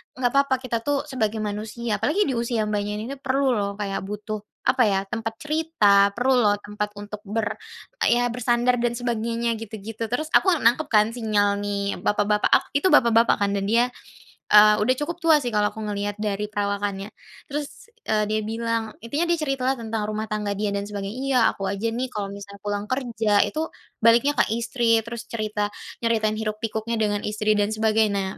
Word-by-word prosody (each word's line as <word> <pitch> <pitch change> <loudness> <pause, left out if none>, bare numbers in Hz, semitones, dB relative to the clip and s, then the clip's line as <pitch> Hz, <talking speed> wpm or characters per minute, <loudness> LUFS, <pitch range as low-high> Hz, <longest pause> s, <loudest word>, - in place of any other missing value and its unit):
nggak 245 -1 0
papa 275 -1 +4
kita 235 -2 -1
tuh 285 -1 +1
sebagai 220 -4 -1
manusia 210 +2 -3
apalagi 315 - +2
di - - 0
usia, 235 -2 0
Mbaknya, 205 0 -1
ini 215 - -4
nih 275 - -7
perlu 270 -1 +1
loh 200 -1 -1
kayak 195 -1 -2
butuh," 210 +1 -5 0.3
apa 255 -1 +4
ya, 195 -1 +2
"tempat 225 -1 -3
cerita, 215 -11 +3
perlu 255 +2 +2
loh 205 -1 +4
tempat 210 0 -4
untuk" 205 0 -7
ber 220 +1 -2 0.5
"ya 245 0 +3
bersandar 245 +1 +1
dan 240 0 0
sebagainya" 235 -1 -1
gitu-gitu. 220 +1 -6
Terus 310 +5 -1
aku 375 -2 +5
nangkep 270 +3 +2
kan 215 -1 +4
sinyal 210 -4 +1
nih 200 -1 -2
bapak-bapak, 210 0 +2
ak - - +5
itu 330 - +2
bapak-bapak 230 -1 +5
kan 200 0 +2
dan 195 -1 -1
dia, 235 +2 +4 0.7
eee, 210 0 +8
udah 255 +4 +3
cukup 335 +3 -3
tua 320 -2 +6
sih 240 - -2
kalau 210 -1 +2
aku 220 - -6
ngelihat 205 0 -3
dari 210 0 -2
perawakannya. 200 -1 -2 0.4
Terus, 295 +10 -6 0.2
eee, 215 -1 +2
dia 215 - +1
bilang 225 -1 -2
intinya 290 +9 -1
dia 340 - +4
cerita 275 -4 -2
lah 270 - +2
tentang 220 -1 -3
rumah 215 0 -2
tangga 210 -1 -2
dia 205 0 -1
dan 200 - -2
sebagainya, 200 +1 -5
"iya 265 -2 +3
aku 195 - -5
aja 200 +3 -2
nih 250 +3 -2
kalau 200 -2 -4
misalnya 200 0 -10
pulang 205 0 -2
kerja 225 -6 +2
itu 315 +1 -3 0.3
baliknya 235 +6 +4
ke - - +7
istri 230 -1 +2
terus 235 0 -7
cerita 215 -2 -2 0.4
nyeritain 220 -2 +1
hiruk 215 -1 -2
pikuknya 220 +1 -2
dengan 205 -1 0
istri 215 0 +1
dan 205 +1 +2
sebagainya. 215 -3 +1
220 Hz, 185 wpm, -24 LUFS, 205-240 Hz, 0.7 s, eee